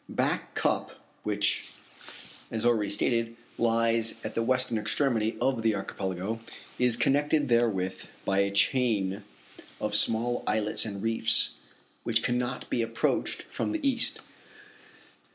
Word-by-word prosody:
Back -, -, -1 dB
Cup, -, -, 0 dB, 0.3 s
which, -, -, 0 dB, 0.8 s
as 115 Hz, 0 st, -3 dB
already 110 Hz, -4 st, +2 dB
stated, 115 Hz, +3 st, 0 dB, 0.2 s
lies 115 Hz, 0 st, +2 dB
at -, -, -4 dB
the -, -, 0 dB
western 125 Hz, -1 st, +1 dB
extremity 110 Hz, 0 st, 0 dB
of 130 Hz, -4 st, +1 dB
the 110 Hz, -1 st, +2 dB
archipelago, 95 Hz, +2 st, -3 dB, 0.4 s
is 125 Hz, -2 st, +3 dB
connected 145 Hz, +1 st, +2 dB
therewith 110 Hz, -6 st, +1 dB, 0.2 s
by 95 Hz, 0 st, +2 dB
a 100 Hz, 0 st, +3 dB
chain 100 Hz, -2 st, +1 dB, 0.6 s
of 105 Hz, -1 st, -2 dB
small 115 Hz, +3 st, +2 dB
islets 105 Hz, 0 st, +2 dB
and 100 Hz, -2 st, -5 dB
reefs, 115 Hz, 0 st, +2 dB, 0.5 s
which -, -, +1 dB
cannot 125 Hz, +1 st, -1 dB
be 120 Hz, -, +1 dB
approached 115 Hz, 0 st, -1 dB
from -, -, -3 dB
the 310 Hz, -3 st, -1 dB
east. 250 Hz, -1 st, +1 dB
115 Hz, 125 wpm, -28 LUFS, 105-120 Hz, 0.8 s, is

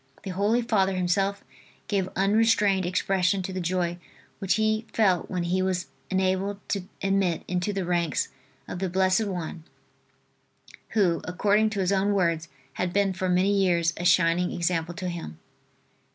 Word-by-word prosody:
The 190 Hz, -, -4 dB
Holy 210 Hz, +6 st, +1 dB
Father 195 Hz, -4 st, +1 dB
himself 195 Hz, +2 st, 0 dB, 0.4 s
gave 190 Hz, -2 st, 0 dB
unrestrained 200 Hz, -2 st, +3 dB
expression 185 Hz, +1 st, +1 dB
to 190 Hz, -, -5 dB
the 185 Hz, -, -3 dB
joy 175 Hz, 0 st, -1 dB, 0.4 s
which 195 Hz, -2 st, +1 dB
he 215 Hz, +1 st, 0 dB
felt 190 Hz, -6 st, +2 dB
when 180 Hz, -2 st, -2 dB
he 180 Hz, +2 st, 0 dB
was 185 Hz, -1 st, -1 dB, 0.2 s
enabled 190 Hz, +1 st, 0 dB
to 195 Hz, -3 st, -2 dB, 0.2 s
admit 195 Hz, -3 st, +1 dB
into 180 Hz, +3 st, -1 dB
the 195 Hz, -2 st, -2 dB
ranks 170 Hz, -5 st, 0 dB, 0.4 s
of 180 Hz, -, -5 dB
the 190 Hz, -1 st, -1 dB
blessed 190 Hz, +3 st, +2 dB
one 175 Hz, -4 st, -5 dB, 1.3 s
who, 180 Hz, -5 st, +3 dB
according 205 Hz, +4 st, +2 dB
to 205 Hz, -2 st, -2 dB
his 185 Hz, 0 st, +1 dB
own 200 Hz, +1 st, +2 dB
words, 170 Hz, -3 st, 0 dB, 0.2 s
had 180 Hz, +3 st, -2 dB
been 200 Hz, -1 st, +2 dB
for 185 Hz, 0 st, -2 dB
many 185 Hz, +3 st, +3 dB
years 175 Hz, -4 st, +2 dB
a 175 Hz, -, -5 dB
shining 175 Hz, 0 st, +3 dB
example 170 Hz, -1 st, -1 dB
to 185 Hz, -, -4 dB
him. 170 Hz, -, -6 dB
185 Hz, 155 wpm, -26 LUFS, 175-200 Hz, 1.3 s, unrestrained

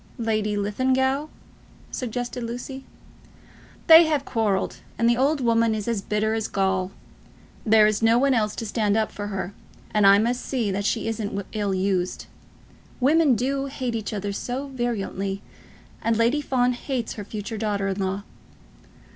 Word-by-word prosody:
"Lady 215 Hz, -3 st, 0 dB
Linlithgow," 260 Hz, +7 st, +1 dB, 0.6 s
suggested 245 Hz, 0 st, -4 dB
Lucy. 245 Hz, +3 st, -6 dB, 1.0 s
"They 330 Hz, +1 st, +9 dB
have 295 Hz, -3 st, 0 dB
quarrelled, 210 Hz, -5 st, 0 dB, 0.2 s
and 230 Hz, -, +2 dB
the 240 Hz, -, +4 dB
old 275 Hz, +4 st, +1 dB
woman 230 Hz, -2 st, +2 dB
is 210 Hz, 0 st, -4 dB
as 230 Hz, -4 st, 0 dB
bitter 210 Hz, +2 st, 0 dB
as 220 Hz, -1 st, -1 dB
gall. 190 Hz, -1 st, 0 dB, 0.8 s
There 215 Hz, 0 st, +6 dB
is 215 Hz, 0 st, +1 dB
no 225 Hz, +1 st, +5 dB
one 275 Hz, +2 st, +3 dB
else 215 Hz, -3 st, 0 dB
to 225 Hz, -, -4 dB
stand 210 Hz, -1 st, +1 dB
up 220 Hz, -1 st, 0 dB
for 205 Hz, 0 st, -5 dB
her, 195 Hz, -1 st, -4 dB, 0.4 s
and 210 Hz, -2 st, +5 dB
I 195 Hz, 0 st, +8 dB
must 240 Hz, +4 st, 0 dB
see 235 Hz, -7 st, -1 dB
that 200 Hz, +1 st, -2 dB
she 225 Hz, +2 st, 0 dB
isn't 205 Hz, -3 st, -3 dB
ill 205 Hz, -3 st, -1 dB
used. 185 Hz, -1 st, -1 dB, 0.7 s
Women 290 Hz, +1 st, +4 dB
do 270 Hz, +4 st, -1 dB
hate 260 Hz, -3 st, -3 dB
each 220 Hz, -2 st, -3 dB
other 205 Hz, -1 st, -3 dB
so 255 Hz, +7 st, -4 dB
virulently, 200 Hz, -6 st, -3 dB, 0.6 s
and 230 Hz, -1 st, +1 dB
Lady 235 Hz, +6 st, +2 dB
Fawn 250 Hz, -3 st, +1 dB
hates 245 Hz, -1 st, -3 dB
her 210 Hz, -, -6 dB
future 210 Hz, +1 st, -6 dB
daughter 205 Hz, -2 st, -1 dB
in 195 Hz, 0 st, -2 dB
law." 195 Hz, +1 st, -2 dB
225 Hz, 160 wpm, -24 LUFS, 205-250 Hz, 1.0 s, They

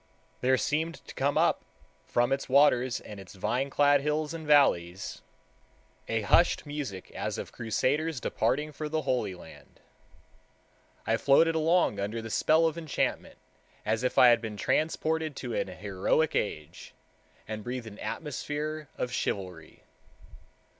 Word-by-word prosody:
There 130 Hz, +1 st, +3 dB
seemed 160 Hz, +5 st, -1 dB
to -, -, -10 dB
come -, -, 0 dB
up -, -, +2 dB, 0.4 s
from 120 Hz, +2 st, +1 dB
its 135 Hz, 0 st, -1 dB
waters 130 Hz, -2 st, +4 dB
and 105 Hz, -2 st, -10 dB
its 95 Hz, 0 st, -12 dB
vine 120 Hz, +8 st, -1 dB
clad 145 Hz, 0 st, +4 dB
hills 150 Hz, +2 st, -1 dB
and 160 Hz, -2 st, -7 dB
valleys 95 Hz, -, +2 dB, 0.9 s
a 115 Hz, -1 st, 0 dB
hushed 170 Hz, +12 st, +3 dB
music 145 Hz, -11 st, -6 dB
as -, -, -4 dB
of -, -, -6 dB
crusaders 140 Hz, +6 st, -1 dB
departing 150 Hz, +5 st, -1 dB
for 150 Hz, +1 st, -5 dB
the 155 Hz, 0 st, -1 dB
Holy 125 Hz, -8 st, -1 dB
Land. 85 Hz, -2 st, -15 dB, 1.3 s
I 115 Hz, +1 st, +2 dB
floated 160 Hz, +6 st, +4 dB
along 160 Hz, -, +2 dB
under 105 Hz, +3 st, -2 dB
the 115 Hz, -1 st, -7 dB
spell 160 Hz, +7 st, +3 dB
of 165 Hz, +1 st, 0 dB
enchantment, 160 Hz, -3 st, -2 dB, 0.5 s
as 110 Hz, +3 st, 0 dB
if 125 Hz, -, -1 dB
I 125 Hz, -, +8 dB
had 120 Hz, -1 st, +4 dB
been 110 Hz, -2 st, -6 dB
transported 155 Hz, +4 st, 0 dB
to 125 Hz, -3 st, -5 dB
an -, -, -1 dB
heroic 100 Hz, -, 0 dB
age, 75 Hz, -7 st, -4 dB, 0.5 s
and 110 Hz, -1 st, -5 dB
breathed 125 Hz, 0 st, -4 dB
an 105 Hz, -2 st, -10 dB
atmosphere 150 Hz, 0 st, -4 dB
of 125 Hz, -, -2 dB
chivalry. 90 Hz, -9 st, -4 dB
130 Hz, 145 wpm, -29 LUFS, 110-155 Hz, 1.3 s, I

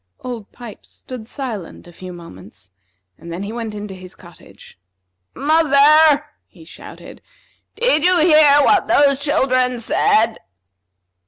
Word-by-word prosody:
Old 240 Hz, -5 st, -8 dB
Pipes 240 Hz, -4 st, -13 dB
stood 245 Hz, -4 st, -11 dB
silent 230 Hz, -, -8 dB
a 175 Hz, -, -16 dB
few 185 Hz, +2 st, -11 dB
moments, 100 Hz, -, -14 dB, 0.5 s
and 170 Hz, -, -11 dB
then 175 Hz, +4 st, -6 dB
he 200 Hz, -, -6 dB
went 225 Hz, -2 st, -6 dB
into 205 Hz, -1 st, -8 dB
his 185 Hz, 0 st, -13 dB
cottage. 165 Hz, -, -18 dB, 0.6 s
"Mother," 300 Hz, 0 st, +3 dB, 0.2 s
he 165 Hz, -6 st, -19 dB
shouted; -, -, -13 dB, 0.5 s
"did 475 Hz, -11 st, +1 dB
you 365 Hz, 0 st, +3 dB
hear 305 Hz, -3 st, +5 dB
what 395 Hz, +3 st, +2 dB
those 285 Hz, -5 st, +2 dB
children 255 Hz, -3 st, 0 dB
said?" 225 Hz, 0 st, +1 dB
245 Hz, 130 wpm, -18 LUFS, 185-290 Hz, 0.6 s, hear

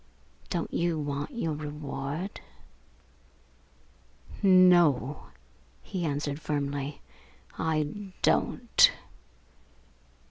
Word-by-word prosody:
Don't 175 Hz, -3 st, -3 dB
you 170 Hz, -1 st, 0 dB
want 145 Hz, -1 st, -3 dB
your 235 Hz, -, -2 dB
reward?" 150 Hz, +3 st, -5 dB, 2.0 s
"No," 175 Hz, -8 st, +4 dB, 0.6 s
he 180 Hz, -3 st, -4 dB
answered 145 Hz, 0 st, -2 dB
firmly, 145 Hz, -1 st, -3 dB, 0.6 s
"I 160 Hz, +5 st, -2 dB
don't!" 70 Hz, -2 st, +4 dB
150 Hz, 65 wpm, -28 LUFS, 145-175 Hz, 2.0 s, No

